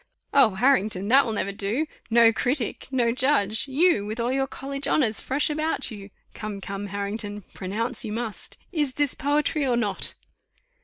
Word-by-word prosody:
"Oh! 240 -8 +5
Harrington, 215 -5 +2
that 265 +1 +5
will 225 - -2
never 200 -1 -1
do. 205 +9 -1 0.2
No 230 0 +6
critic! 250 0 -1
No 245 -3 +1
judge! 245 -4 +2
You! 285 - +3
with 215 +3 -5
all 235 +2 0
your 270 0 0
college 275 +1 -3
honours 230 -8 +2
fresh 275 +3 0
about 310 -3 -1
you. 200 -2 -9 0.2
Come, 210 -2 -6
come, 200 +1 -5
Harrington, 205 +1 -4
pronounce 220 +6 -2
you 215 - -5
must. 225 -1 -5
Is 295 -7 -1
this 290 -2 +2
poetry 295 +1 0
or 250 -3 +1
not? 210 -4 -1
235 Hz, 165 wpm, -25 LUFS, 205-275 Hz, 0.2 s, No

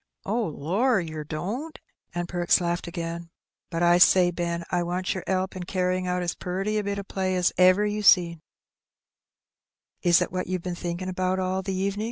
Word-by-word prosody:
"Oh, 225 +3 0
lor, 195 - +1
yer 155 -3 -5
don't?" 210 - -5 0.4
and 175 0 -2
Perks 175 0 +2
laughed 175 0 -2
again. 170 -1 -5 0.4
"But 170 -1 -1
I 175 0 +5
say, 180 0 +6
Ben, 170 -1 -3
I 175 - +1
wants 180 +1 -2
yer 190 - -4
'elp 190 0 -1
in 185 - -5
carryin' 185 0 -1
out 180 0 -1
as 175 - -1
puriy 195 +4 -2
a - - -2
bit 200 0 -2
o' 200 - -4
play 190 -1 -2
as 180 -1 +2
ever 185 +3 +5
you 210 0 -2
seen." 170 -5 +4 1.6
"Is 175 -1 +5
it - - -2
what 185 0 -3
you've 185 -1 -3
been 180 - -3
thinking 175 +1 -4
about 185 0 -1
all 185 0 -1
the 190 0 -3
evenin'?" 195 +2 -1
185 Hz, 195 wpm, -26 LUFS, 175-190 Hz, 1.6 s, say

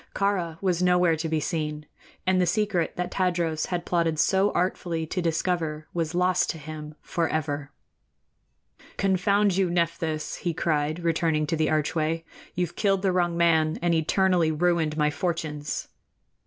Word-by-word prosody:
Kāra 180 -5 0
was 180 -2 +1
nowhere 180 -2 +4
to 160 +1 -3
be 160 0 +1
seen, 150 -1 -3 0.4
and 185 0 +3
the 180 - +2
secret 200 -3 0
that 180 0 -3
Tadros 170 -4 0
had 175 -1 -3
plotted 165 -2 +1
so 190 +5 +3
artfully 175 -2 -1
to 180 +3 -3
discover 165 -2 -1
was 165 -1 -2
lost 180 +1 +2
to - - -2
him 155 0 -8
forever. 155 -4 -2 1.3
"Confound 195 0 +2
you, 190 -2 +2
Nephthys!" 165 -2 -1
he 170 -2 -2
cried, 155 -1 0
returning 160 -2 +1
to 165 - -1
the 155 -1 +1
archway, 155 +1 0 0.3
"you've 175 -1 -2
killed 195 -2 +1
the 190 - +3
wrong 175 -2 +1
man 160 -2 +3
and 175 0 +1
eternally 170 +1 +2
ruined 160 -1 +1
my 150 -1 +2
fortunes!" 150 -2 -3
170 Hz, 150 wpm, -26 LUFS, 155-180 Hz, 1.3 s, nowhere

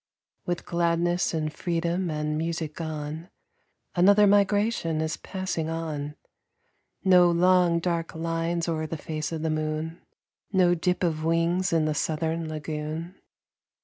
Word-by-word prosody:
With 175 -1 -2
gladness 170 +1 +1
and 155 -2 -2
freedom 170 +2 -1
and 150 0 -2
music 160 -1 -2
gone, 155 +1 -5 0.6
Another 200 +4 +6
migration 205 -4 +2
is 160 0 -1
passing 185 -4 -3
on. 150 -3 -4 0.9
No 180 -2 +6
long, 175 0 +4
dark 170 -1 -2
lines 165 +1 -1
o'er 155 -1 -1
the 165 - -4
face 155 0 -4
of 160 -1 -4
the 160 - 0
moon; 155 +2 -3 0.5
No 185 -3 +4
dip 180 +2 0
of 160 -3 0
wings 165 +3 +1
in 165 -2 +2
the 155 - +1
southern 160 +1 -1
lagoon. 155 +2 -4
165 Hz, 130 wpm, -26 LUFS, 155-175 Hz, 0.9 s, Another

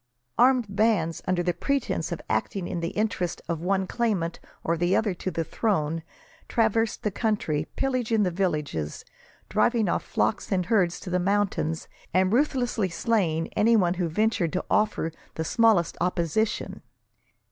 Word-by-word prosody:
Armed 250 -1 +5
bands, 200 -5 +1
under 180 -1 +1
the 175 0 +1
pretence 275 - -1
of - - -3
acting 190 -4 -1
in 175 - -3
the 170 0 -2
interest 205 -5 -1
of 165 -2 -2
one 190 +2 +1
claimant 190 -7 -1 0.2
or 165 - +1
other 180 +5 +1
to 185 - -4
the 165 -2 -2
throne, 165 -4 -1 0.5
traversed 225 -1 +1
the 210 - 0
country, 185 -9 -1
pillaging 245 -5 +1
the 180 - +1
villages, 150 - -2 0.4
driving 230 -4 +2
off - - +1
flocks 215 - -1
and 185 -2 +1
herds 180 -4 +2
to 180 - -6
the 180 - +2
mountains, 185 -4 0 0.3
and 185 +2 +3
ruthlessly 245 -6 +1
slaying 170 -3 0
any 220 +2 +3
who 180 -3 +2
ventured 205 -1 +1
to 185 - -1
offer 210 -6 +1 0.2
the 160 - -2
smallest 220 -4 +3
opposition. 180 +4 -1
190 Hz, 145 wpm, -26 LUFS, 170-220 Hz, 0.5 s, Armed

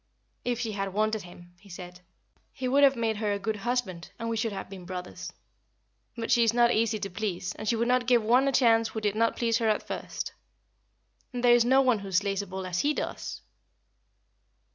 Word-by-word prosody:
"If 245 -1 -1
she 230 -3 -2
had 195 -2 -4
wanted 215 0 +1
him," 175 -1 -14
he 200 +1 -18
said, 180 0 -10 0.5
"he 260 -1 -4
would 275 +3 +4
have 275 -1 +6
made 225 -2 -1
her 210 -1 -1
a - - -1
good 210 +2 -3
husband, 205 -6 -2
and 230 - -4
we 230 - -1
should 225 0 -1
have 195 - -6
been 190 -1 -10
brothers. 180 0 -7 0.9
But 230 -1 -3
she 235 - +5
is 230 0 +2
not 240 0 +5
easy 225 -1 +1
to 200 -1 -4
please, 185 -2 -3
and 215 - -4
she 235 - +2
would 230 +1 0
not 250 0 +2
give 240 -3 +4
one 250 +5 +4
a - - +3
chance 230 -3 +4
who 220 - -5
did 210 -2 0
not 230 +2 +1
please 230 -1 +1
her 225 -2 +2
at 215 - 0
first. - - -5 1.0
And 245 -1 -4
there 240 -1 +7
is 240 -1 +5
no 265 +2 +5
one 250 -5 +3
who 195 -1 -8
slays 195 +1 +1
a 200 - -8
bull 190 +1 -5
as 180 -1 -2
he 295 +1 +1
does!" - - -5
220 Hz, 225 wpm, -28 LUFS, 195-240 Hz, 1.0 s, there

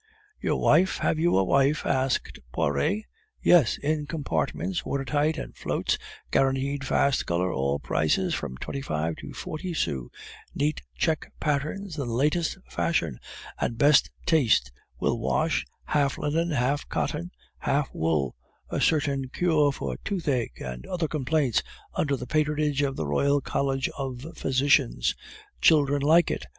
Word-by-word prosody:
"Your - - 0
wife; 190 +1 +4
have 155 - 0
you 170 - +3
a 95 - +4
wife?" 140 +8 +2
asked 130 -1 0
Poiret. 70 - 0 0.4
"Yes, 165 -10 +5
in 150 0 -1
compartments, 165 +4 -2
water 140 -1 -2
tight 150 +4 +1
and - - -6
floats, - - -1 0.3
guaranteed 135 +1 +1
fast 140 0 +2
color, 90 +1 0
all 70 +1 0
prices 75 +2 0
from 65 - -4
twenty 140 - -5
five 80 - -2
to - - -8
forty 170 +2 -5
sous, 65 - -2 0.5
neat 150 +2 0 0.2
check 160 -2 0
patterns 155 +4 -2
in 135 - -2
the - - -3
latest 150 +7 +1
fashion 85 - -1 0.4
and 115 - -1
best 145 +3 +5 0.2
taste, 115 - +3 0.3
will - - 0
wash, - - 0 0.2
half 140 -2 +1
linen, 165 +3 0
half 140 -1 0
cotton, 170 +4 -2 0.3
half 140 0 +1
wool; 75 -6 0 0.4
a - - -1
certain 140 -4 +1
cure 155 -2 +2
for 70 - -4
toothache 145 - -2
and 60 -1 -6
other 175 -3 -1
complaints 140 -3 +1 0.3
under 145 -3 +1
the 125 - -6
patronage 150 0 +1
of 135 -1 0
the 80 - -2
Royal 140 - +2
College 135 0 -1
of 135 -1 -5
Physicians! 135 - +2 0.5
children 145 -2 +4
like 160 +4 +5
it! - - -4
140 Hz, 145 wpm, -26 LUFS, 125-155 Hz, 0.5 s, Yes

